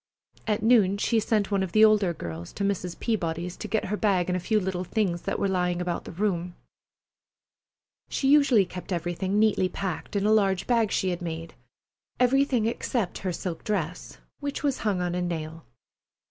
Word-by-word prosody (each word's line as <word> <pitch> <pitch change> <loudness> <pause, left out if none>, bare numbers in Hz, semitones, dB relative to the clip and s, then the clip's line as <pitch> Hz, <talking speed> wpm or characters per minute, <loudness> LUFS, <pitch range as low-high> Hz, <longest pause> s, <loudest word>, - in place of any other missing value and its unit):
At 210 -1 0
noon 215 -4 +4
she 225 +2 +2
sent 215 -2 0
one 200 -1 +2
of 190 -3 -3
the 220 0 +7
older 210 -4 +4
girls 85 - -7
to 200 - -3
Mrs. 180 -3 -2
Peabody's, 175 -5 -2
to - - -6
get 220 - 0
her 210 - -1
bag 195 -4 +1
and - - 0
a - - 0
few 215 +4 +1
little 185 -2 -2
things 185 -3 -1
that - - -2
were - - 0
lying 180 -2 0
about 175 -1 -3
the - - -7
room. 180 -2 -2 1.5
She 270 - -1
usually 275 -8 +5
kept 180 +1 -9
everything 175 +3 -1
neatly 210 -3 +3
packed 195 +1 -5
in 200 0 +1
a 215 - +4
large 195 -4 +2
bag 230 -4 +2
she 190 - +1
had 175 0 -3
made—everything 215 - -2
except 230 -3 -2
her 185 - -2
silk 170 0 -5
dress, 180 -5 -3 0.2
which 285 0 -4
was 280 -3 0
hung 200 -4 0
on 175 -1 -1
a 180 - -1
nail. 165 -3 -4
190 Hz, 185 wpm, -26 LUFS, 175-215 Hz, 1.5 s, the